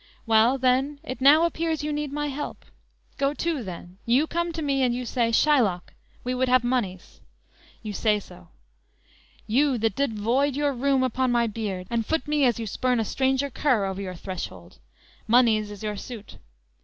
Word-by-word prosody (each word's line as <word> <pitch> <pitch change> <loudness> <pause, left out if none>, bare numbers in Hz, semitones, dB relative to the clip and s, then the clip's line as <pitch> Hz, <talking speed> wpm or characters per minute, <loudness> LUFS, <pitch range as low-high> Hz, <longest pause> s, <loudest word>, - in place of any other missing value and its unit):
Well, 225 +3 +4
then, 265 +3 +1
it 255 -4 -6
now 300 +5 +7
appears 325 -2 -1
you 300 0 -2
need 295 -1 -3
my 295 +1 -2
help; 290 +2 -6 0.5
Go 280 +1 +1
to, 325 -6 -2
then; 180 -1 -9
you 250 +6 +3
come 340 +1 -2
to 320 -1 -4
me 275 -2 +1
and 245 -2 +2
you 250 0 -4
say: 235 -1 0
Shylock, 230 -9 +2 0.3
we 250 - -2
would 255 0 0
have 255 -1 +4
monies; 230 -7 -3 0.6
you 210 -2 -5
say 210 +1 +1
so; 85 - -15 1.0
You, 260 +4 +2
that 225 -2 0
did 275 -6 -1
void 260 +6 +1
your 290 0 +1
rheum 265 +1 +1
upon 255 0 0
my 240 -1 +2
beard, 205 -4 -4
And 230 -1 +1
foot 320 +7 -2
me 295 -2 +2
as 240 -3 +2
you 225 - -3
spurn 250 +3 0
a 225 - 0
stranger 265 +4 0
cur 245 -7 +1
Over 190 0 -4
your 185 -2 -5
threshold; 185 +1 -8 0.5
monies 220 -3 +4
is 205 0 -9
your 210 -1 -3
suit. 220 -1 -9
250 Hz, 185 wpm, -25 LUFS, 215-280 Hz, 1.0 s, now